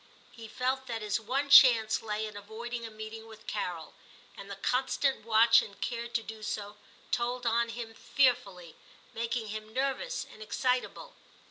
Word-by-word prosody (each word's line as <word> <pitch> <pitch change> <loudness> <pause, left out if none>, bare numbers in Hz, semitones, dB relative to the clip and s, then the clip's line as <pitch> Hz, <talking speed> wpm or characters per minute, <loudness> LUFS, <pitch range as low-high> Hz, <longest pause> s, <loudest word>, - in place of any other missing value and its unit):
He 230 -2 -11
felt 260 +3 -2
that 225 -2 -4
his 210 +1 0
one 270 +6 -2
chance 230 -5 +7
lay 215 0 -3
in 215 -1 -8
avoiding 230 +3 -6
a - - -9
meeting 220 +1 -9
with 220 0 -14
Carol, 175 -6 -4 0.4
and 200 - -10
the 200 - -5
constant 260 +4 0
watch 225 +1 +6
and 200 -2 -10
care 235 -1 -3
to 235 -1 -2
do 220 0 -9
so 210 -1 -5 0.3
told 245 +1 -1
on 235 0 +2
him 230 -1 -6
fearfully, 200 - 0 0.4
making 230 -1 -3
him 215 0 -6
nervous 275 - -1
and 215 - -15
excitable. 255 - -2
225 Hz, 160 wpm, -30 LUFS, 215-245 Hz, 0.4 s, chance